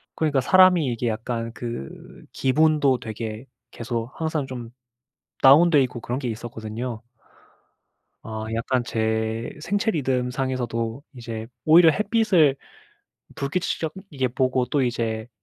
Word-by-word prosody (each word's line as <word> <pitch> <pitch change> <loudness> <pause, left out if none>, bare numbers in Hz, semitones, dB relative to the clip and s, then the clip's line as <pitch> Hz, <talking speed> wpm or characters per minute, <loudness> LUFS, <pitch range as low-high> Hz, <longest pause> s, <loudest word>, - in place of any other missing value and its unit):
그러니까 150 -4 +1
사람이 185 +2 +5
이게 120 0 -2
약간 115 +1 -3
그 115 - -8
기분도 145 -2 +2
되게 110 0 -6 0.3
계속 115 0 -4
항상 160 -3 -1
좀 125 -3 -7 0.7
다운돼 150 +3 +7
있고 125 -2 -5
그런 125 +3 -3
게 130 - -4
있었거든요. 115 +1 -6 1.2
아. 110 -1 -5
약간 120 +2 0
제 110 0 -1
생체 205 +7 0
리듬상에서도 125 - -2
이제 115 -2 -6 0.2
오히려 165 +2 +7
햇빛을 200 - +3 0.8
불규칙적이게 160 -1 -2
보고 130 0 +1
또 140 +3 0
이제 115 -2 -2
125 Hz, 255 characters per minute, -24 LUFS, 115-150 Hz, 1.2 s, 다운돼